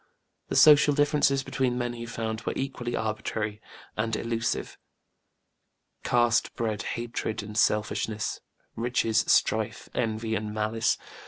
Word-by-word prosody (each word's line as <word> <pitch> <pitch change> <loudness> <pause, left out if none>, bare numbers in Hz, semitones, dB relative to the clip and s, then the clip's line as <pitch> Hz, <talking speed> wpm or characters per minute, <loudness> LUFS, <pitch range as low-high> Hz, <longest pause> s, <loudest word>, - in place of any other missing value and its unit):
The - - -3
social 150 -1 +7
differences 145 -2 +3
between 130 -2 -1
men 120 -1 -2
he 120 0 -7
found 110 -1 -4
were - - -3
equally 125 -3 -3
arbitrary 110 -1 -3 0.3
and 110 +1 -1
illusive; 115 +1 -2 1.2
caste 120 -1 +2
bred 110 -3 -2 0.2
hatred 115 -2 -3
and 105 +1 -9
selfishness; 105 0 0 0.3
riches 115 -1 +1
strife, 110 0 +1
envy 110 -1 -1
and 105 -1 -3
malice. 110 +1 +1
115 Hz, 115 wpm, -27 LUFS, 110-120 Hz, 1.2 s, social